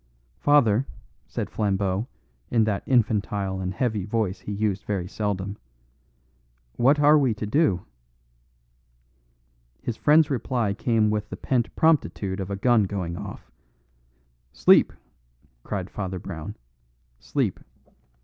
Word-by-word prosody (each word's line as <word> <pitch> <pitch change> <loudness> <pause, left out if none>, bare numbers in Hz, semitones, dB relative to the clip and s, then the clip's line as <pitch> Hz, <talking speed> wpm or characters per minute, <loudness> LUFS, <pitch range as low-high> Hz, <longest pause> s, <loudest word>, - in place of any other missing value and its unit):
"Father," 135 -4 +4 0.4
said - - -4
Flambeau 100 0 0 0.4
in 115 -2 +3
that 105 -2 0
infantile 105 -5 +1
and 90 0 -2
heavy 110 -1 -1
voice 105 -1 -1
he - - -7
used 100 -1 -1
very 95 -4 -2
seldom, 100 -1 -3 1.2
"what 140 +5 +4
are 150 +1 +6
we 130 -6 +1
to 105 - -4
do?" 105 - +1 2.0
His 120 - -3
friend's 150 0 +4
reply 120 -5 0
came 110 0 +1
with 105 0 -2
the - - -6
pent 120 -3 -1
promptitude 110 -11 +1
of 95 0 -4
a 100 - -2
gun 115 +1 +3
going 90 -3 -4
off. - - -9 1.0
"Sleep!" - - +5 0.7
cried 95 - -4
Father 95 -2 -4
Brown. 85 -3 -7 0.6
"Sleep. - - -1
105 Hz, 120 wpm, -25 LUFS, 95-120 Hz, 2.0 s, are